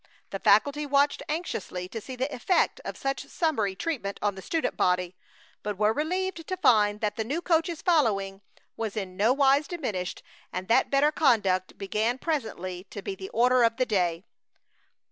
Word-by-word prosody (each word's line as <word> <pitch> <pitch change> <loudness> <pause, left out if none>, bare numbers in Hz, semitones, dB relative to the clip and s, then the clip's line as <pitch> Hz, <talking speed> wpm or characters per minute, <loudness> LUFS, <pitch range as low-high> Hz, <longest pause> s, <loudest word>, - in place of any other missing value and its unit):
The 195 - -4
faculty 285 +10 +3
watched 280 +1 +2
anxiously 210 - -3
to 225 - -6
see 260 +4 -8
the 265 +4 -2
effect 345 +8 +1
of - - -6
such 270 0 -3
summary 225 - 0
treatment 230 -8 -3
on 205 -1 0
the 190 - -9
student 325 - -1
body, 180 0 +1 0.5
but 210 -2 -4
were 215 +1 +3
relieved 345 +3 -2
to 370 - -2
find 210 - +3
that 210 -1 -1
the 220 - 0
new 280 +9 -2
coach's 330 -1 0
following 200 - +1 0.3
was 220 -1 -4
in 190 -3 -4
no 210 +5 +3
wise 275 +2 +3
diminished, 215 - -4 0.3
and 185 +1 -5
that 230 - +4
better 280 +2 +3
conduct 205 - +2
began 215 +5 -1
presently 210 - -3
to 200 0 -9
be 195 - -3
the 190 0 -8
order 250 +2 +3
of 230 0 +3
the 255 - +2
day. 180 -4 0
230 Hz, 175 wpm, -27 LUFS, 195-290 Hz, 0.5 s, that